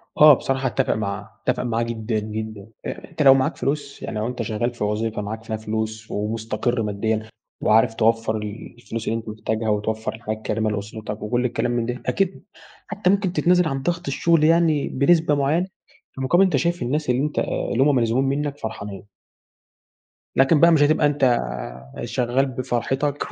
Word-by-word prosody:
آه، 150 0 +9
بصراحة 135 0 0
أتفق 120 - +1
معاه، 100 -2 -4 0.2
أتفق - - +1
معاه 115 -1 0
جدًا، 115 -1 -2
جدًا، 110 -1 -6 0.2
أ - - -6
أنت 160 - -4
لو 135 -2 +8
معاك 135 -1 +1
فلوس 140 0 -3
يعني 110 - -4
لو 110 - -1
أنت 125 -1 -4
شغّال 115 +2 -1
في 115 - -4
وظيفة 105 +1 -1
معاك 110 +2 -5
فيها 110 -1 -3
فلوس، 110 0 -4
ومستقر 115 +3 -1
ماديًا، 110 +1 -1 0.4
وعارف 110 +1 +4
توفر 115 -1 +1
ال 105 +2 -7
الفلوس 115 -2 -6
اللي 115 - +1
أنت 110 - -9
محتاجها 110 +1 -2
وتوفر 110 +1 -1
الحياة 110 -1 -4
الكريمة 110 0 -1
لأسرتك 105 +1 -5
وكل 120 +4 0
الكلام 120 0 0
من 120 -1 0
ده 125 +1 -4
أكيد 195 -1 -1 0.4
حتّى 210 -3 0
ممكن 195 -2 +2
تتنازل 180 -2 +3
عن 135 -2 -2
ضغط 175 +2 -2
الشغل 165 +3 +2
يعني 160 -2 +3
بنسبة 155 +2 +3
معيّنة، 150 +6 +1 0.5
مقابل 175 +9 +4
أنت 185 - +2
شايف 175 0 0
الناس 145 +4 -1
اللي 125 +1 +2
أنت 150 0 -2
اللي 125 - 0
هم 145 +1 +4
ملزومين 120 +2 +2
منّك 145 -1 -3
فرحانين. 100 -4 -6 1.3
لكن 135 +4 +5
بقى 170 +2 +7
مش 160 -3 +4
هتبقى 150 +1 +3
أنت 145 -1 0
آآ، 65 - -1
شغّال 125 +1 +1
بفرحتك، 135 +2 -2
120 Hz, 175 wpm, -23 LUFS, 110-145 Hz, 1.3 s, آه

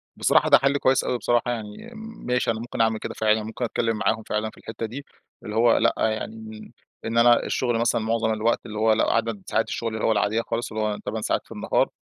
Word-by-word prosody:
بصراحة - - +3
ده - - +8
حل 140 +1 +1
كويّس 135 -1 +2
أوي 125 - -1
بصراحة 120 +1 +1
يعني، 115 - -7
م 225 0 -10
ماشي 125 -1 +1
أنا 110 - -4
ممكن 115 -1 -3
أعمل 110 -1 +2
كده - - -5
فعلًا، 110 0 +1
ممكن 110 +3 -4
أتكلّم 115 -1 -1
معاهم 110 +1 0
فعلًا 105 +1 -2
في - - -19
الحتّة 115 0 -6
دي، 135 +6 -7 0.4
اللي 105 - -6
هو 115 +1 +4
لأ، - - +3
يعني 110 - -1
م 220 -1 -10 0.3
إن 115 +1 -2
أنا 120 0 +5
الشغل 120 -3 0
مثلًا 115 0 +1
معظم 110 0 0
الوقت 110 +2 0
اللي 110 - -7
هوّ 110 0 +4
لأ، 110 - +2
عدد 115 -3 -1
ساعات 110 - 0
الشغل 115 -1 -3
اللي 110 - -2
هوّ - - +3
العاديّة 105 +2 +1
خالص، 115 0 -4
اللي 110 0 -2
هوّ 105 -1 -1
8 110 +1 -3
ساعات - - 0
في - - -23
النهار، - - 0
115 Hz, 240 wpm, -24 LUFS, 110-120 Hz, 0.4 s, ده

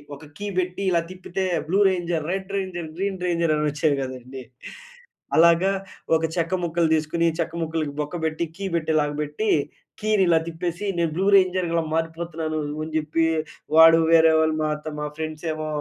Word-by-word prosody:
ఒక 150 +2 -13
కీ 205 - -4
పెట్టి 180 +1 -3
ఇలా 170 -1 +3
తిప్పితే 185 +1 -4 0.2
blue 190 +3 +2
ranger, 175 -4 -2
red 195 +1 -5
ranger, 180 -4 -4
green 190 -1 -2
ranger 170 -2 +1
అనొచ్చేవి 150 0 +1
గదండీ. 130 0 -8 0.9
అలాగా 170 +3 +5 0.5
ఒక 160 - 0
చెక్క 170 0 -1
ముక్కలు 170 0 +1
దీసుకొని, 160 +2 0
చెక్క 170 0 -2
ముక్కలకి 160 -2 -2
బొక్క 150 +3 -3
బెట్టి, 160 +1 -1
కీ 200 - -7
బెట్టేలాగా 155 -2 +1
బెట్టి 150 +9 -2 0.5
కీనిలా 195 -6 +3
తిప్పేసి, 170 +3 -4
నేను 170 -2 +1
బ్లూ 190 +3 0
రేంజర్ 185 -2 +3
ఇలా 165 -1 +1
మారిపోతున్నాను, 165 -1 -3 0.3
అని 160 - -6
జెప్పి 155 +1 0 0.5
వాడు 165 0 +8
వేరే 165 -1 +6
వాళ్ళు 160 0 +2
మా 155 - 0 0.2
త - - -3
మా 150 - -2
ఫ్రెండ్సేమో 155 0 -4
165 Hz, 155 wpm, -23 LUFS, 155-175 Hz, 0.9 s, వాడు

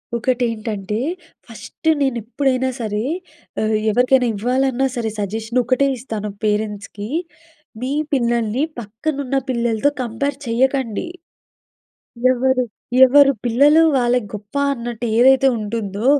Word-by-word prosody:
ఒకటేంటంటే, 225 -4 -2 0.5
ఫస్ట్ 235 +7 -9
నేను 265 -3 +1
ఎప్పుడైనా 260 +2 0
సరే, 210 -2 -2 0.6
ఆహ్, 215 0 +1 0.2
ఎవరికైనా 250 +2 +3
ఇవ్వాలన్నా 260 +4 +1
సరే 230 -2 -1
సజెషన్ 220 +4 -2
ఒకటే 255 +3 +2
ఇస్తాను 220 -4 -5
పేరెంట్స్‌కి. 210 0 -2 0.7
మీ 260 +2 -2 0.2
పిల్లల్ని 235 -1 +1 0.2
పక్కనున్న 265 +5 -3
పిల్లలతో 235 +1 +1
కంపేర్ 265 +4 -3
చేయకండి. 260 - 0 1.2
ఎవరు, 260 0 +1 0.4
ఎవరు 275 +2 +6
పిల్లలు 285 +7 +5
వాళ్ళకి 245 -3 +1
గొప్ప 210 +4 -9 0.2
అన్నట్టు 240 -2 -5
ఏదైతే 265 +2 +6
ఉంటుందో, 210 -1 -4
240 Hz, 100 wpm, -20 LUFS, 220-265 Hz, 1.2 s, ఎవరు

